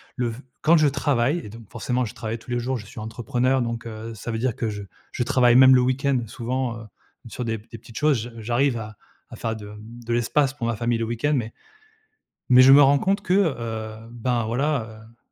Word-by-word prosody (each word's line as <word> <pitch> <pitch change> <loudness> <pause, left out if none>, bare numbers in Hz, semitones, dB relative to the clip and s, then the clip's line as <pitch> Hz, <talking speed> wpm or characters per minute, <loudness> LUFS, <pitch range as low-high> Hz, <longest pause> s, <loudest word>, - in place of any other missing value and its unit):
le 125 -2 -1
v 115 +2 -7 0.2
quand 165 +2 +5
je 155 -1 +4
travaille 140 0 +1
et 105 - -9
donc 115 0 -13
forcément 125 +2 -2
je 105 - -8
travaille 115 +1 -4
tous 120 - -16
les 120 - -1
jours, 130 +2 -2
je 105 - -10
suis 125 +2 -10
entrepreneur 120 +4 -1
donc, 115 -1 -3
heu, 115 0 -7
ça 115 +3 -6
veut 110 - -3
dire 125 -1 -1
que 115 - -2
je 105 -1 -6 0.3
je - - -4
travaille 120 -1 +4
même 130 +1 +8
le 125 - +5
week-end, 130 +2 +1
souvent, 120 +1 -3
heu, 115 - -10 0.4
sur 120 +2 -5
des 110 -1 -2
p 105 - -21
des 115 - -7
petites 110 0 -13
choses. 150 -3 +3
J 120 - -7
j'arrive 120 +3 +1
à 110 -2 -8 0.3
à - - -9
faire 115 0 -3
de, 105 -2 -9
mmh, 110 +3 -11
de 120 - 0
l'espace 130 +4 +1
pour 135 -5 -5
ma 115 0 0
famille 120 +1 0
le 115 - -2
week-end, 120 +6 -1
mais 115 -3 -3 1.0
mais 125 0 +8
je 130 +1 +8
me 140 +1 +9
rends 140 0 +6
compte 195 +6 +1
que, 180 -3 -1
heu, 115 - -1
ben, 120 0 -1
voilà, 115 -2 -2
heu 115 - -28
120 Hz, 240 wpm, -23 LUFS, 115-130 Hz, 1.0 s, me